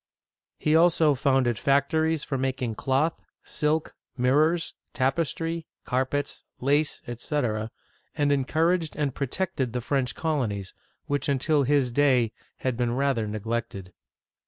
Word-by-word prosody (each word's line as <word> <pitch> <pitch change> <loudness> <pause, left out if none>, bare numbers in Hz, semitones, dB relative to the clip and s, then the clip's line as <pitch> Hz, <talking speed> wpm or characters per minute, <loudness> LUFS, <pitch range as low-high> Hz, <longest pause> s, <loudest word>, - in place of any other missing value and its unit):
He 155 +1 +2
also 165 -2 +5
founded 130 -4 +2
factories 155 +3 +2
for 135 - -3
mak 130 0 -1
ing 115 -2 -1
cloth, 135 +8 0 0.2
silk, 155 +1 -1 0.2
mirrors, 150 +7 +2 0.2
tapestry, 165 +4 -1 0.2
carpets, 130 +3 -1 0.2
lace, 145 +3 +1
etc., 120 -3 -2 0.5
and 145 -1 +2
en 135 -2 +2
couraged 165 +2 +1
and 145 -3 -1
protected 140 -3 -2
the 125 - -1
French 130 0 -1
colonies, 120 - -2 0.3
which 145 0 -1
until 140 +1 +2
his 135 -2 +2
day 125 -4 +3 0.3
had 130 -2 0
been 120 -1 0
rather 135 -5 +1
neglected. 105 -3 -4
140 Hz, 125 wpm, -26 LUFS, 125-150 Hz, 0.5 s, also